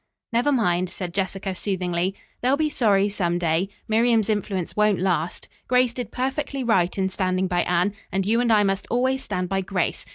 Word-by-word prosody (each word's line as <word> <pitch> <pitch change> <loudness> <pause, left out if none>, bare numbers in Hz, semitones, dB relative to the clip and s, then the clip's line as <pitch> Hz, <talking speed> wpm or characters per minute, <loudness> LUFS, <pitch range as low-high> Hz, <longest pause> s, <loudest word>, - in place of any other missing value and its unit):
"Never 245 +5 +2
mind," 185 -8 +1
said 180 -2 -6
Jessica 195 0 -2
soothingly. 185 -1 -1 0.3
"They'll 260 +3 +2
be 305 0 0
sorry 205 -7 +3
some 175 -4 0
day. 170 +2 0 0.2
Miriam's 225 -1 +3
influence 195 -4 -2
won't 210 -2 +3
last. 175 -2 -1 0.2
Grace 250 -1 +3
did 245 -3 -5
perfectly 270 +1 -2
right 190 -7 +2
in 190 -1 +1
standing 185 -1 0
by 180 -1 +1
Anne, 180 +3 +1 0.2
and 190 0 0
you 230 +4 +2
and 240 -2 +2
I 210 -2 +5
must 195 0 -1
always 260 +2 +1
stand 180 0 -2
by 195 +1 0
Grace. 185 -2 -2
195 Hz, 185 wpm, -24 LUFS, 185-235 Hz, 0.3 s, I